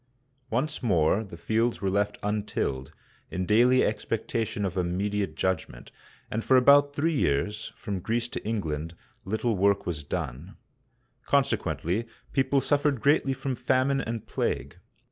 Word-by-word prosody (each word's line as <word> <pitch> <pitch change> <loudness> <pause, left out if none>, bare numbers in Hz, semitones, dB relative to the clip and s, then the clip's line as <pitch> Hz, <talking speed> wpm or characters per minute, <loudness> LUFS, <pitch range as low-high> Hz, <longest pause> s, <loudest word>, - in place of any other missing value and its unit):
Once 130 +7 -1
more 95 - +2
the 95 -5 -10
fields 115 +6 0
were 100 - 0
left 100 +1 0
untilled, 100 -10 -2 0.4
in 90 0 -2
daily 120 +5 +5
expectation 110 -1 -2
of 95 -1 -3
immediate 95 0 -1
judgment, 90 -9 -2 0.4
and 110 +1 -2
for 130 - +5
about 145 +2 +6
three 160 +3 +1
years, 105 - 0
from 100 -5 -4
Greece 115 +6 -1
to - - -5
England, 85 -7 -3 0.3
little 110 +3 0
work 100 +1 +2
was 80 -4 -3
done. 70 +4 -5 0.7
Consequently, 100 +8 0 0.3
people 135 0 +2
suffered 145 -1 +2
greatly 135 +2 +3
from 135 0 -3
famine 130 +2 +1
and 115 -1 -4
plague. - - -2
105 Hz, 135 wpm, -27 LUFS, 95-130 Hz, 0.7 s, about